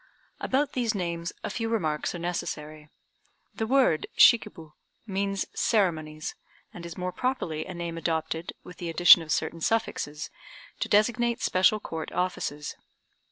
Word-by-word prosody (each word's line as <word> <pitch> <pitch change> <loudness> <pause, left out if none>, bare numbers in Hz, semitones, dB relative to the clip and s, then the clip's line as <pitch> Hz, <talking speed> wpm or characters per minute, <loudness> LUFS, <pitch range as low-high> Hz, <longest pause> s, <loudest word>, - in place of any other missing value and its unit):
About 275 +2 0
these 235 -3 0
names 170 -2 -3
a - - -3
few 225 +1 -2
remarks 160 -8 -1
are - - -3
necessary. 155 -3 -5 0.6
The 220 - -3
word 255 - +3
"Shikib" 210 -10 +5 0.3
means 195 -1 -1
"ceremonies," 155 -8 0 0.4
and 170 -1 -8
is 170 - -9
more 180 0 -2
properly 180 -9 -2
a 185 - -7
name 170 -1 -4
adopted, 160 0 -2
with 180 - -12
the 175 - -5
addition 175 +1 +8
of 160 -1 -6
certain 165 - -1
suffixes, 150 -9 -1 0.5
to - - -2
designate 235 +3 +2
special 190 +4 +3
Court 160 -5 -6
offices. 150 -5 -2
175 Hz, 140 wpm, -27 LUFS, 160-215 Hz, 0.6 s, addition